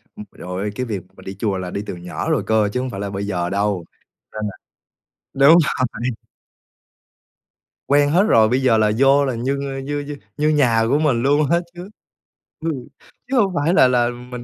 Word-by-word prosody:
Ừm, 105 - -9
rồi, 95 +3 -5
cái 125 +2 -3
việc 105 -5 -3 0.2
mà - - -13
đi 95 0 -8
chùa 100 -4 -1
là 90 -1 -5
đi 100 - -3
từ 95 - -6
nhỏ 90 +1 -5
rồi - - +1
cơ, 110 -2 +2
chứ 125 - -1
hông 130 0 -3
phải 100 - -7
là 100 0 -3
bây 100 +1 -4
giờ 90 -3 -2
đâu, 100 -2 -1 0.5
nên 110 - -5
là 100 - -7 0.8
đúng 140 +5 +7
rồi. 140 -5 +1 2.0
Quen 145 0 +4
hết 180 +6 +4
rồi, 110 - +4
bây 125 +3 +1
giờ 125 -4 +3
là 105 -1 +3
vô 135 +2 +4
là 130 -3 -2
như, 135 +4 -2
a, 135 - -5
như 145 +2 -3
như 145 0 -6 0.2
như 150 +1 +2
nhà 125 -7 +3
của 140 +3 +2
mình 130 -6 +1
luôn 145 +2 +2
á 170 - +4
chứ, 175 +3 -9 0.7
ừ, 165 - -3 0.6
chứ 265 0 -1
hông 200 -5 +3
phải 155 +5 +1
là 130 - +6
là 120 -1 +2
mình 125 0 -8
125 Hz, 210 wpm, -20 LUFS, 105-145 Hz, 2.0 s, đúng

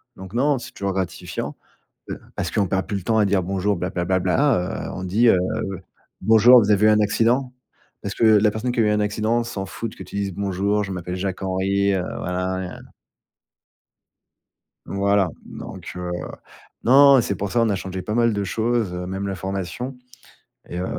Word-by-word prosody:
donc 95 +1 -11
non, 140 +3 +2
c'est - - -9
toujours 100 -1 -3
gratifiant, 95 -3 -4 0.5
heu, - - -5 0.2
parce - - -3
qu'on 100 -2 +1
perd 95 -2 -1
plus 100 - -2
le 95 - -7
temps 110 +4 +1
à 105 - +4
dire: 100 -2 +1
«Bonjour, 95 +2 0
bla, 90 +1 -2
bla, 90 -1 -2
bla, 95 +1 +1
bla, 95 +1 +1
heu,». - - -6
On 90 - -5
dit: 105 +7 +2
«Heu, 95 - +5 0.8
bonjour, 115 +3 +7
vous 105 0 +1
avez 105 +1 +4
eu - - +7
un 105 0 +4
accident?» 120 +5 +1 0.5
parce 100 -1 -5
que - - -1
la 105 -1 +5
personne 110 +4 -2
qui 120 - -2
a - - +5
eu 105 - +2
un 105 - +1
accident 110 +3 0
s'en 105 -4 -5
foute 115 +2 -6
que - - -9
tu 95 - -11
dises: 100 -1 -2
«Bonjour, 100 +2 0
je 95 - -6
m'appelle 90 0 -5
Jacques-Henri, 95 +1 0
heu,». 95 -2 0 0.2
Voilà, 90 +1 -2
hein. 95 -1 -6 2.1
Voilà, 100 -1 +1 0.2
donc - - -9
heu, 90 0 -4 0.7
non, 140 +3 +7
non, 130 - +5
c'est 100 - -2
pour 100 +1 -4
ça, 120 - +2
on 115 - +2
a 100 - +1
changé 95 0 -5
pas 105 - -4
mal 115 -1 +3
de 100 -1 -1
choses, 110 0 -1
heu, 90 0 -4
même 95 +2 -4
la 95 - -3
formation 95 +7 -4 0.7
et 85 - -5
heu, 90 - -2
100 Hz, 205 wpm, -22 LUFS, 95-110 Hz, 2.1 s, bonjour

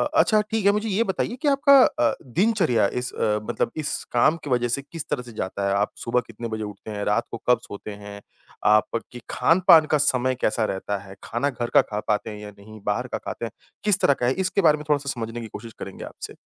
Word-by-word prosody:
अच्छा 215 -7 +5
ठीक 220 -2 0
है, 200 - +7
मुझे 210 +2 -1
ये 210 +3 +2
बताइए 225 +3 -2
कि 300 - 0
आपका 280 0 +5
अ, 120 - +2
दिनचर्या 165 - +2
इस 125 0 -4
मतलब 105 +1 0
इस 150 -1 -2
काम 150 +7 +3
की 145 - -6
वज़ह 120 -1 +2
से 130 +4 -1
किस 150 +3 -8
तरह - - -1
से 120 - -11
जाता 100 -1 -3
है? 100 - +1
आप 100 +1 +1
सुबह 125 +1 +1
कितने 115 +1 -6
बजे 110 -1 -4
उठते 105 +1 -8
हैं, 105 -1 -4
रात 110 +3 +1
को - - -4
कब 125 - +5
सोते 100 +1 -8
हैं? 100 0 -9 0.4
आपकी 115 +3 +1
खान-पान 170 -2 +5
का 150 - +5
समय 130 -2 +1
कैसा 110 +1 +1
रहता 100 +1 -3
है? 95 0 -12
खाना 120 +5 -1
घर 120 -3 -4
का - - +9
खा 105 - -5
पाते 105 +1 0
हैं 105 - -7
या 105 0 -8
नहीं, 110 +2 -12
बाहर 115 +5 -1
का - - +1
खाते - - -5
हैं, 115 - -6 0.3
किस 210 -2 +2
तरह 140 - +5
का - - +2
है? 125 - +3
इसके 190 +3 0
बारे 155 -4 +5
में 150 - -9
थोड़ा-सा 145 -2 +1
समझने 115 +1 -4
की 115 - -6
कोशिश 115 +1 -9
करेंगे 95 - -7
आपसे। - - -9
120 Hz, 235 wpm, -24 LUFS, 105-155 Hz, 0.4 s, का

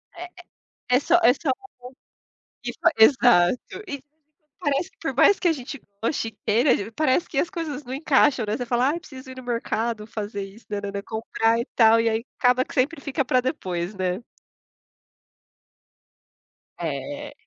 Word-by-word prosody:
É 345 - -7 0.5
é 250 - -2
é - - +2
só 290 - +2
é 245 - +7
só 290 +2 -4 1.2
e - - -3
faz - - +4
exato. 240 - +4
E 280 -5 -5 0.6
parece 290 -1 0
que - - -36
por - - -3
mais 405 - +5
que 360 - +1
a - - +5
gente 275 -1 -7 0.2
goste 230 -1 -1
e - - -19
queira, 225 -1 +2
parece 305 +3 +1
que 275 - -6
as 330 - +2
coisas 310 -5 -5
não 250 0 -7
encaixam, 275 -3 +3
né, 210 +1 -2
você 245 - -4
fala: 245 +2 +2
"Ai, 300 - 0
eu - - -4
preciso 265 -5 -11
ir - - -10
no 255 - -8
mercado 230 -2 -2
fazer 205 -2 -5
isso, 195 +4 -12
nã 205 -1 -3
nã 200 0 -4
nã, 200 0 -4
comprar, 225 +1 0
e 235 - -2
tal", 225 -1 +6
e 230 - +2
aí 225 +2 -2
acaba 250 +1 +3
que - - -12
sempre 275 +5 +1
fica 280 0 -1
para 255 0 +2
depois, 185 - -3
né. 185 +1 -2 2.6
É. 290 0 -5
250 Hz, 180 wpm, -24 LUFS, 220-285 Hz, 2.6 s, é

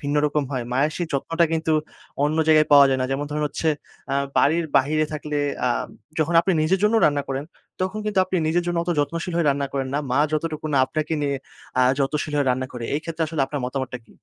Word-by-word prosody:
ভিন্ন 145 +1 -2
রকম 150 0 0
হয়। 125 -2 -2
মায়ের 140 +4 +2
সেই 175 - -2
যত্নটা 165 +5 +1
কিন্তু 160 0 0 0.5
অন্য 150 +2 0
জায়গায় 155 -1 +6
পাওয়া 140 -1 +9
যায় 130 -1 +1
না। 130 - +1
যেমন 140 +2 -1
ধরুন 150 0 -2
হচ্ছে 160 - -2 0.4
আ - - +2 0.2
বাড়ির 165 +3 +3
বাহিরে 155 +3 +3
থাকলে 150 0 -4 0.3
আ - - +3 0.5
যখন 160 +2 +1
আপনি 190 - 0
নিজের 185 +5 +2
জন্যও 220 +2 +4
রান্না 145 -1 +1
করেন। 135 +2 -2 0.4
তখন 190 +3 -1
কিন্তু 210 -2 -1
আপনি 185 0 -2
নিজের 175 +2 +2
জন্য 175 -1 -1
অত 175 - -2
যত্নশীল 165 +4 -1
হয়ে 170 -3 +1
রান্না 140 0 -1
করেন 135 -1 -2
না। 145 - +2
মা 130 - +2
যতটুকু 155 0 -2
না 140 - +3
আপনাকে 155 +3 -3
নিয়ে 140 -1 0 0.4
আ - - +6 0.2
যত্নশীল 150 +2 -1
হয়ে 140 -2 +1
রান্না 130 +1 -1
করে। 120 -2 -6
এই 150 - 0
ক্ষেত্রে 165 0 -3
আসলে 155 -3 -1
আপনার 145 - -4
মতামতটা 130 -1 -3
কী? - - -20
150 Hz, 225 wpm, -23 LUFS, 140-165 Hz, 0.5 s, পাওয়া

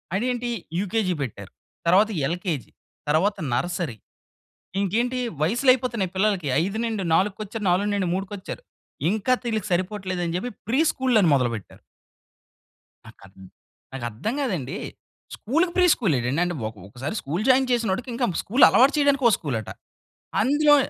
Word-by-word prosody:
అదేంటి 245 +3 -1 0.3
యూకేజీ 200 -1 0
పెట్టారు. 125 -6 -6 0.4
తర్వాత 195 +5 +5 0.2
ఎల్‌కేజి 170 - -3 0.4
తరువాత 185 +7 +2 0.2
నర్సరీ. 165 -1 -2 0.8
ఇంకేంటి 235 +6 0 0.2
వయసులు 235 - +2
అయిపోతున్నాయి 235 -7 -2
పిల్లలకి 190 -4 +1 0.2
5-4 200 -2 0
వచ్చారు, 215 +1 -6
4-3 195 0 0
వచ్చారు. 190 - -7 0.5
ఇంకా 220 +5 +1
తీళ్ళకి 220 -5 -2
సరిపోవట్లేదు 185 0 -1
అని 165 - -2
చెప్పి 195 +8 -2 0.2
ప్రీ 250 +5 +1
స్కూళ్ళు 255 -3 +1
అని 175 - +4
మొదలుపెట్టారు. 115 -6 -2 1.3
నా - - -11
కద్ 95 0 -17 0.6
నాకర్థం 120 - -3
కాదండి. 185 - -2 0.6
స్కూల్‌‌‌కి 330 - 0
ప్రీ 360 -1 +5
స్కూల్ 195 - 0
ఏంటండి. 125 +6 -1
అంటే 175 0 -2
ఒక 110 - -12
ఒకసారి 130 - -5
స్కూల్ 165 +8 -2
జాయిన్ 260 0 +4
చేసినోడికి 235 0 0
ఇంక 240 0 0
స్కూల్ 245 +7 +5
అలవాటు 265 +4 +5
చేయడానికి 285 -2 +2
ఒక - - +3
స్కూలట. 120 - -3 0.7
అందులో, 290 +5 +5
200 Hz, 130 wpm, -24 LUFS, 170-240 Hz, 1.3 s, తర్వాత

